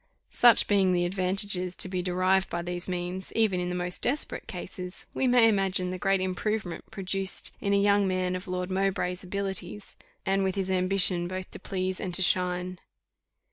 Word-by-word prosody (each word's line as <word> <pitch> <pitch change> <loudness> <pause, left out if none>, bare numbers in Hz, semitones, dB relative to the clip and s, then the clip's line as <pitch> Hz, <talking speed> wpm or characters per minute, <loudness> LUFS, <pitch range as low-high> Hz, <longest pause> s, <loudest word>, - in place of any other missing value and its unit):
Such 240 -1 +5
being 195 -3 +3
the 175 0 +1
advantages 185 0 +2
to - - +7
be 185 -1 -3
derived 185 +1 +1
by 170 0 -3
these 175 0 -5
means, 180 +1 -4
even 215 -5 +3
in 180 0 -2
the 180 - -3
most 180 0 -3
desperate 285 +4 -2
cases, 180 0 -7
we 260 - +1
may 245 -2 +5
imagine 190 -3 +2
the 185 - -5
great 195 +1 +1
improvement 185 0 -3
produced 195 0 -2
in 200 - -1
a 200 - +3
young 200 0 +3
man 185 -1 -1
of 185 +1 -7
Lord 180 0 -3
Mowbray's 185 -1 -1
abilities, 195 +1 -5 0.3
and 195 0 +1
with 190 -1 -1
his 190 -1 -2
ambition 185 -1 +1
both 185 +1 -6
to - - -9
please 185 -1 -3
and 180 -3 -2
to 190 - +2
shine. 180 0 0
185 Hz, 180 wpm, -27 LUFS, 180-195 Hz, 0.3 s, to